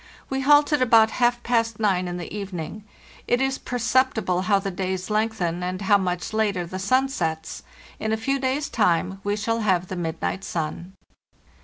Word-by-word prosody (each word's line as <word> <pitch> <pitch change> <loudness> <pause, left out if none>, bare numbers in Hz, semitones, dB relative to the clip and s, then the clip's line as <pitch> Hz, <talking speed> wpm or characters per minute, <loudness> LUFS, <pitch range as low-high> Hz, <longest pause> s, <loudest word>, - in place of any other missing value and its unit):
We 270 0 0
halted 290 +1 +4
about 225 -3 +5
half 240 0 +2
past 230 -2 0
nine 190 -4 +1
in 175 0 -4
the 175 +3 -7
evening. 200 0 -6 0.4
It 245 - +2
is 270 0 0
perceptible 240 -6 +1
how 200 +1 +3
the 195 0 -3
days 185 +1 -3
lengthen, 210 -6 0
and 180 +1 -3
how 200 +1 +4
much 180 0 -3
later 205 -5 0
the 185 +2 -6
sun 255 +8 +2
sets; 160 -11 -3 0.4
in 220 - -2
a 220 - +1
few 275 +5 -1
days' 265 +3 -1
time 190 -2 +1
we 205 0 0
shall 225 +2 -1
have 185 -5 +1
the 185 - -4
midnight 175 +2 -3
sun. 170 +3 -4
205 Hz, 175 wpm, -24 LUFS, 180-240 Hz, 0.4 s, about